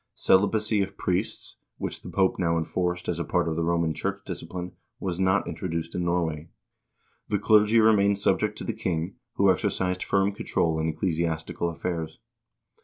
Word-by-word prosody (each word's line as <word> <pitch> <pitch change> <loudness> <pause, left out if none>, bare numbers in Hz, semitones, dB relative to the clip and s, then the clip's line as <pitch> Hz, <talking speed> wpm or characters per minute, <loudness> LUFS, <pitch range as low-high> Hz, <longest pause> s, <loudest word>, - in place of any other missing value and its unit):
Celibacy 105 +2 +3
of 95 0 -4
priests, 90 -1 -2 0.2
which - - -5
the - - -9
Pope 95 -1 +1
now 85 -2 +2
enforced 90 +2 -2
as 85 -1 -1
a - - 0
part 90 0 0
of 80 - -1
the 85 - -1
Roman 85 -1 +1
church 100 +4 -3
discipline, 90 0 -6 0.3
was 90 -2 -3
not 95 +1 +2
introduced 85 0 -4
in 90 - -1
Norway. 85 -2 -1 0.8
The 105 - +2
clergy 105 +2 +5
remained 100 -2 +4
subject 100 - +1
to - - -5
the - - -2
king, 85 +1 -3 0.2
who 100 -1 +5
exercised 90 +1 -1
firm 100 0 +2
control 80 -5 0
in 80 - 0
ecclesiastical 85 +1 -1
affairs. 80 -1 -4
90 Hz, 165 wpm, -26 LUFS, 85-100 Hz, 0.8 s, clergy